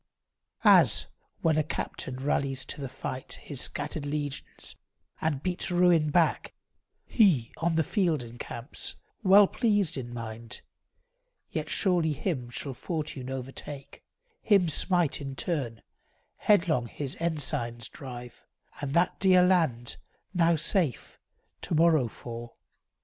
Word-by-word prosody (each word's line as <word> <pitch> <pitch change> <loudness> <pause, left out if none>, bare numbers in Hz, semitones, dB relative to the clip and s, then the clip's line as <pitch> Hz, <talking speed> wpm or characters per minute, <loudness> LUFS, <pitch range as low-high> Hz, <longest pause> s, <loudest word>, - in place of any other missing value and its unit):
As - - +6 0.4
when 160 -2 +3
a - - +2
captain 130 -3 -4
rallies 135 0 -1
to - - -6
the 135 - -4
fight 130 0 -5
His 140 -4 -7
scattered 145 +1 -3
legions, 145 -1 -4 0.5
and 145 -3 -1
beats 180 +1 0
ruin 175 -3 +4
back, 165 +2 +1 0.5
He, 170 - +3
on 165 +1 0
the 160 - +3
field, 165 - +1
encamps, 120 +2 -6 0.3
well 200 0 +7
pleased 205 - +1
in 120 -2 -5
mind. 115 0 -7 0.9
Yet - - -3
surely 175 -5 +2
him 135 -6 -3
shall 135 +3 -4
fortune 150 -3 -4
overtake, 135 +2 -7 0.4
Him 195 -6 +4
smite 175 -1 +1
in 135 -1 -5
turn, 135 -9 -2 0.5
headlong 170 - +3
his 135 +3 -5
ensigns 135 -8 -1
drive; 125 -3 -9 0.4
And 140 -1 -3
that 175 +1 +2
dear 185 -2 +6
land, 160 -11 +2 0.4
now 170 -2 +4
safe, 165 - -1 0.4
to - - -1
morrow 160 -5 +4
fall. 120 +1 -8
150 Hz, 120 wpm, -28 LUFS, 130-170 Hz, 0.9 s, well